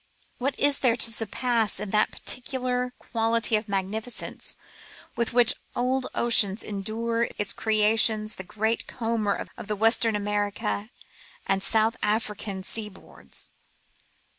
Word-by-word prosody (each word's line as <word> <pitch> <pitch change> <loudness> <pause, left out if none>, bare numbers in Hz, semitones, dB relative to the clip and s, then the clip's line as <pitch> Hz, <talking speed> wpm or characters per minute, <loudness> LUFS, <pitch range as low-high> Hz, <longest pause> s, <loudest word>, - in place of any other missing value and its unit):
What 270 +3 -2
is 285 0 +3
there 245 -4 +3
to 230 -1 +3
surpass 225 -1 0
in 210 -1 -4
that 210 0 +3
particular 250 0 -2
quality 230 0 0
of 215 0 -2
magnificence 200 +5 -2 0.6
with 235 - -1
which 240 -1 +6 0.2
old 255 +1 0
ocean 210 -4 +5
endows 225 +3 -2
its 205 -1 +2
creations 215 0 +3
the 190 - -6
giant 220 +4 -2
comber 225 -4 -2
of - - -9
the 210 - -1
Western 225 +1 +3
American 205 +1 -2 0.6
and 195 0 +1
South 225 +3 +1
African 210 -2 -2
seaboards 210 0 -4
220 Hz, 120 wpm, -26 LUFS, 210-235 Hz, 0.6 s, which